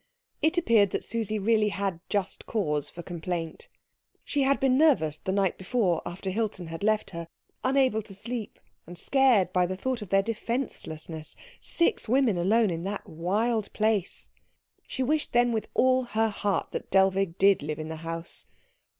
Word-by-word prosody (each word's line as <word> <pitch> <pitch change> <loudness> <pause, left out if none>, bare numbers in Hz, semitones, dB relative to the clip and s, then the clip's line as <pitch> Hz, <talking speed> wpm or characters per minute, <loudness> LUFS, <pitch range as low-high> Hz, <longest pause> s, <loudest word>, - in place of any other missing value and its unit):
It 315 +4 +2
appeared 225 - +4
that - - -2
Susie 220 -2 0
really 215 +1 +2
had 195 -4 -2
just 200 -2 -2
cause 150 -10 -1
for 175 - -9
complaint. 170 -1 -5 0.5
She 290 - -1
had 275 +1 +3
been 265 -1 +3
nervous 250 - +3
the 190 - -3
night 195 -2 +1
before 190 -3 +1
after 185 +2 -4
Hilton 205 -3 -2
had 165 0 -7
left 215 +1 +1
her, 170 -2 -6 0.4
unable 260 -4 +2
to 200 -2 -12
sleep, 230 +2 -5 0.3
and 175 +1 -9
scared 245 -9 +3
by 180 -1 +3
the 185 +1 -4
thought 255 +3 -2
of 205 - -7
their 195 +1 +4
defencelessness 195 - -4 0.3
six 335 -9 0
women 255 -4 +3
alone 210 +3 +3
in 165 0 -3
that 200 +1 -4
wild 205 +7 -1
place. 215 -3 0 0.6
She 260 - -2
wished 300 +3 0
then 240 0 +4
with 220 -2 -2
all 260 0 +4
her 225 -1 +1
heart 205 -1 -1
that - - -5
Dellwig 190 -2 +2
did 195 -1 +5
live 150 +1 -3
in 155 0 -5
the 160 - -5
house. 165 +1 -5
200 Hz, 170 wpm, -27 LUFS, 175-235 Hz, 0.6 s, did